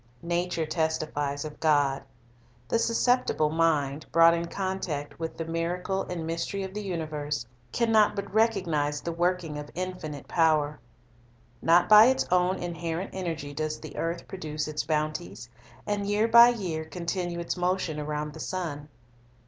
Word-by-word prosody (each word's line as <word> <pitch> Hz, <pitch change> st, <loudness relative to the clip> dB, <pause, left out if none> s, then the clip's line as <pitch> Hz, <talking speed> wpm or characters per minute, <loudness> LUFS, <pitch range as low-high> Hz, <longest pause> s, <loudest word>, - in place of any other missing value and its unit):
Nature 170 Hz, -1 st, -1 dB
testifies 155 Hz, -3 st, -1 dB
of 150 Hz, -, -8 dB
God. 145 Hz, -3 st, +2 dB, 0.7 s
The 230 Hz, -, +1 dB
susceptible 230 Hz, -9 st, +2 dB
mind, 155 Hz, -3 st, +1 dB
brought 165 Hz, 0 st, +7 dB
in 170 Hz, 0 st, -1 dB
contact 180 Hz, -7 st, -4 dB
with 165 Hz, -1 st, -4 dB
the 165 Hz, -, -3 dB
miracle 175 Hz, +4 st, -2 dB
and 170 Hz, -3 st, -4 dB
mystery 165 Hz, +4 st, -3 dB
of 190 Hz, 0 st, -6 dB
the 210 Hz, -, -4 dB
universe, 155 Hz, -, -3 dB, 0.3 s
can 235 Hz, -, +1 dB
not 215 Hz, -2 st, +4 dB
but 200 Hz, -1 st, -5 dB
recognize 170 Hz, -10 st, +1 dB
the 170 Hz, -, -3 dB
working 170 Hz, -3 st, -1 dB
of 145 Hz, -, -7 dB
Thc -, -, -18 dB
Pervading 185 Hz, +1 st, -2 dB
infinite 155 Hz, -5 st, -8 dB
power. 155 Hz, -3 st, +2 dB, 0.8 s
Not 170 Hz, +2 st, +5 dB
by 215 Hz, +1 st, +9 dB
its 260 Hz, +1 st, +2 dB
own 180 Hz, +1 st, +3 dB
inherent 170 Hz, +1 st, -4 dB
energy 165 Hz, -6 st, -4 dB
does 155 Hz, +1 st, -2 dB
ui -, -, -15 dB
e -, -, -7 dB
the -, -, -12 dB
earth 170 Hz, +1 st, -3 dB
produce 155 Hz, -5 st, -4 dB
its 155 Hz, 0 st, -2 dB
bounties, 150 Hz, -, -2 dB, 0.4 s
and 205 Hz, -1 st, -1 dB
year 210 Hz, +2 st, +2 dB
by 235 Hz, +1 st, +9 dB
year 180 Hz, -9 st, -2 dB
con 170 Hz, +2 st, -8 dB
tinue 175 Hz, -1 st, -2 dB
its 170 Hz, 0 st, -3 dB
motion 180 Hz, -3 st, -1 dB
around 150 Hz, 0 st, -3 dB
the 160 Hz, -, -10 dB
sun. 155 Hz, -5 st, -4 dB
165 Hz, 165 wpm, -27 LUFS, 150-185 Hz, 0.8 s, by